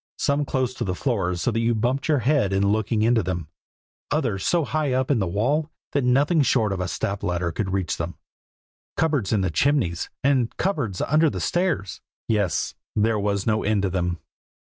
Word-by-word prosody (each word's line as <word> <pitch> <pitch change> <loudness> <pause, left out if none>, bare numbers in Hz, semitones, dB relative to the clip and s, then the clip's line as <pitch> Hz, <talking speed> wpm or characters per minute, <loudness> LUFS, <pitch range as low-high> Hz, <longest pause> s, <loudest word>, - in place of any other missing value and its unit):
Some 145 0 +1
close 130 -2 -1
to - - -4
the 90 -2 -2
floor 95 -8 0
so 90 +7 0
that 115 - -1
you 115 0 +2
bumped 125 +5 0
your 155 -2 +3
head 135 -8 +3
in 100 +1 +2
looking 110 +1 +1
into 115 0 +3
them, 85 -5 -4 0.6
others 115 -11 -1
so 170 -3 +2
high 150 -3 0
up 130 +2 +1
in 130 - +3
the 95 - 0
wall 135 - 0 0.2
that 140 - +1
nothing 145 +6 +3
short 110 -7 +2
of 95 - -4
a 90 - -1
step 100 +2 -3
ladder 90 -3 -1
could 95 +2 -3
reach 95 -4 -1
them; 85 +1 -4 0.8
cupboards 145 -11 +1
in 105 -3 +2
the 95 -2 0
chimneys, 105 - +1
and 130 -4 +1
cupboards 120 - -1
under 155 +3 +3
the - - -4
stairs; 175 - -1 0.3
yes, 100 -7 0 0.2
there 110 0 +2
was 100 -1 -1
no 110 -1 +1
end 105 -1 +1
to 95 - 0
them. 90 -1 -1
110 Hz, 195 wpm, -24 LUFS, 95-140 Hz, 0.8 s, your